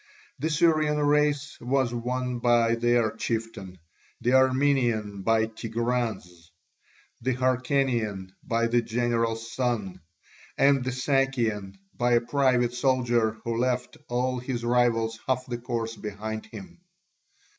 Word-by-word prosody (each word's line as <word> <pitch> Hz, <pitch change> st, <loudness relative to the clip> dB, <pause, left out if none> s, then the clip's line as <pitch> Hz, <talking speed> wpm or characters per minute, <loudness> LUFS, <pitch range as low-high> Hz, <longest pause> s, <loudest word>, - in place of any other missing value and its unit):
The 155 Hz, +4 st, -1 dB
Syrian 155 Hz, -2 st, +2 dB
race 145 Hz, -1 st, +1 dB
was 125 Hz, 0 st, 0 dB
won 125 Hz, +1 st, -2 dB
by 120 Hz, -1 st, +3 dB
their 120 Hz, -1 st, +2 dB
chieftain, 110 Hz, -6 st, -4 dB, 0.4 s
the 125 Hz, -, +1 dB
Armenian 130 Hz, -6 st, +2 dB
by 110 Hz, +2 st, +2 dB
Tigranes, 110 Hz, -6 st, -3 dB, 0.7 s
the 130 Hz, +1 st, 0 dB
Hyrcanian 125 Hz, -6 st, 0 dB
by 115 Hz, -1 st, 0 dB
the 120 Hz, +1 st, +2 dB
general's 115 Hz, -1 st, -1 dB
son, 120 Hz, -7 st, -2 dB, 0.6 s
and 140 Hz, -1 st, +4 dB
the 130 Hz, -, -2 dB
Sakian 125 Hz, -7 st, 0 dB, 0.2 s
by 120 Hz, 0 st, +1 dB
a 120 Hz, -, +4 dB
private 125 Hz, -1 st, +1 dB
soldier 120 Hz, -3 st, +1 dB
who 115 Hz, -2 st, -2 dB
left 125 Hz, 0 st, -1 dB
all 125 Hz, +1 st, 0 dB
his 120 Hz, -1 st, -4 dB
rivals 115 Hz, -2 st, +1 dB
half 130 Hz, -1 st, 0 dB
the 120 Hz, -2 st, -5 dB
course 115 Hz, -2 st, -3 dB
behind 110 Hz, +1 st, -6 dB
him. 180 Hz, -2 st, -11 dB
120 Hz, 120 wpm, -26 LUFS, 115-130 Hz, 0.7 s, and